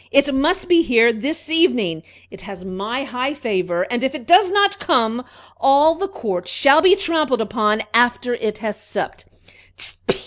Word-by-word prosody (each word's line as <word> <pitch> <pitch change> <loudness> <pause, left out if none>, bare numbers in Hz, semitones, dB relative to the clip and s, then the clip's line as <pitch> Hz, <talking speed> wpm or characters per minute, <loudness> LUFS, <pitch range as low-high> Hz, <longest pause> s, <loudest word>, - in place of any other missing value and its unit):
It 280 0 +2
must 320 +7 0
be 345 -1 +4
here 235 -5 +3
this 295 +8 -5
evening! 245 - +1 0.3
It 195 - -13
has 190 -2 -11
my 205 +8 -5
high 265 +1 -4
favor; 185 -9 -2
and 245 +1 -2
if 265 +3 -2
it 255 - -9
does 365 +2 +5
not 405 0 +2
come, 245 -7 0 0.4
all 285 +4 +4
the 390 +4 -4
court 195 - -5
shall 275 - +4
be 380 +2 +5
trampled 315 - 0
upon 215 0 -1
after 245 +1 +2
it 215 -3 -3
has 215 -2 -6
supped!" - - -6
250 Hz, 165 wpm, -19 LUFS, 215-320 Hz, 0.4 s, does